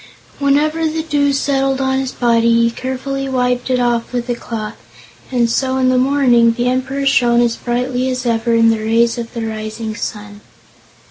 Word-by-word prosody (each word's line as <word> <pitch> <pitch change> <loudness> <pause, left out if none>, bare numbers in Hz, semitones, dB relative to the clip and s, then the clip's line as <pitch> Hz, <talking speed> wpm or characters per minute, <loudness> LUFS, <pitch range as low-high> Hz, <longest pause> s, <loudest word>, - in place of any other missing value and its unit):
Whenever 305 +3 +1
the 315 +1 -2
dew 290 -3 +1
settled 270 -1 0
on 265 0 0
his 265 -1 -3
body 235 -1 +2
he 230 - +2
carefully 270 +2 -4
wiped 250 -1 -1
it 255 -1 +1
off 240 -1 0
with 245 -1 -3
a - - +1
cloth, 220 -3 -6 0.5
and 240 -2 +2
so 260 +3 0
in 255 -1 +2
the 255 - +2
morning 250 -4 +3
the 240 +1 -1
Emperor 265 +2 -1
shone 240 -3 +3
as 240 -1 +2
brightly 250 +1 -2
as 255 0 -3
ever 230 0 +1
in 230 0 +4
the 225 - -1
rays 230 +2 +1
of 235 +1 -7
the 230 -1 -3
rising 220 0 -5
sun. 210 -1 -6
250 Hz, 185 wpm, -17 LUFS, 230-270 Hz, 0.5 s, in